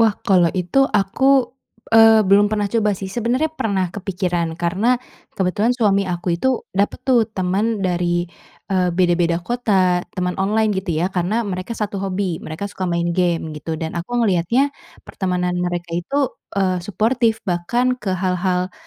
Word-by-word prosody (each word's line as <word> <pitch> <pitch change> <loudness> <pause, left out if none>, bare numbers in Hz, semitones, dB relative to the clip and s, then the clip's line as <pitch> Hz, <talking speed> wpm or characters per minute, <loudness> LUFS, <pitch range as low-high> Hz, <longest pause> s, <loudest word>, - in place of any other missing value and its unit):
Wah. 220 -2 +4
Kalau 180 -4 +4
itu 180 +9 0
aku, 250 +7 +2 0.4
eee, 225 -1 +7
belum 205 +1 +6
pernah 210 -1 0
coba 210 -4 +1
sih. 195 - -6
Sebenernya 250 +7 0
pernah 200 -10 -1
kepikiran 180 -4 -2
karena 195 +9 +1 0.4
kebetulan 200 +5 +1
suami 200 -4 +2
aku 175 0 -1
itu, 260 - +2 0.3
dapet 200 +1 0
tuh 240 -4 +3
teman 200 +2 -1
dari, 175 -1 0 0.5
eee, 185 -1 +2
beda-beda 175 -2 +2
kota, 190 -6 +1
teman 180 0 -1
online 215 +2 +1
gitu 190 -2 -3
ya. 180 +3 -1
Karena 195 +6 0
mereka 185 +4 -4
satu 205 -2 -3
hobi. 190 -3 -2
Mereka 160 +6 -6
suka 185 -1 -3
main 170 0 0
game 170 -3 0
gitu. 160 +2 -5
Dan 160 -1 -4
aku 180 +9 -3
ngeliatnya 230 +7 +2 0.3
pertemanan 180 -1 -2
mereka 175 -1 -3
itu, 270 +11 -1 0.2
eee, 185 -2 +1
suportif. 220 +3 0
Bahkan 240 +9 0
ke 200 -2 -3
hal-hal 180 0 -1
190 Hz, 155 wpm, -20 LUFS, 180-220 Hz, 0.5 s, eee